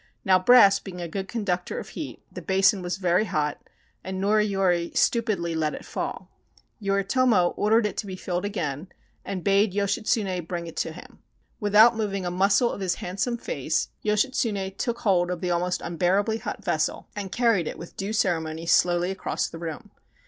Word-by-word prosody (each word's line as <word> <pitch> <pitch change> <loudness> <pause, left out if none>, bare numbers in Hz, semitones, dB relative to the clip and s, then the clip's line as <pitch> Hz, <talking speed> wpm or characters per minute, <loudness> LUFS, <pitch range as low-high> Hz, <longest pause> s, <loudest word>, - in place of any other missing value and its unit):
Now 185 -1 +5
brass 200 -1 +7
being 185 -3 -9
a 175 - -4
good 190 +3 -4
conductor 195 -6 -2
of - - -6
heat, - - -7
the - - -8
basin 195 +1 +3
was 175 +1 -3
very 185 +2 +2
hot 150 -6 -2 0.4
and 190 0 -5
Noriyori 195 -4 +1
stupidly 210 -8 +1
let 155 -2 -1
it - - -9
fall. - - -5 0.5
Yoritomo 200 0 +2
or 210 - 0
dered 225 0 +4
it 210 - -3
to 205 - -3
be 190 - -5
filled 180 0 -3
again 175 -6 -3 0.4
and 185 -3 -5
bade 200 0 +3
Yoshitsune 200 -2 0
bring 170 -1 -4
it 165 - -9
to - - -1
him. 180 - -13 0.4
Without 215 +3 +6
moving 200 -4 -2
a 175 - -2
muscle 195 +6 +3
of - - -6
his 185 -2 0
handsome 200 +7 -2
face - - -2
315 215 +1 +1
JAPAN 190 -1 -3
Yoshitsune - - -35
took 235 -2 -2
hold 180 -5 +2
of 180 -1 -3
the 180 0 -2
almost 180 +1 0
unbearably 190 +6 0
hot - - -6
vessel - - -1
and 200 -2 -5
carried 230 -9 +2
it - - -5
with 170 - -10
due 195 +2 -4
ceremony 165 -6 -1
slowly 175 +1 +3
across 195 - -2
the 165 - -9
room. 200 +6 -7
195 Hz, 185 wpm, -25 LUFS, 175-210 Hz, 0.5 s, brass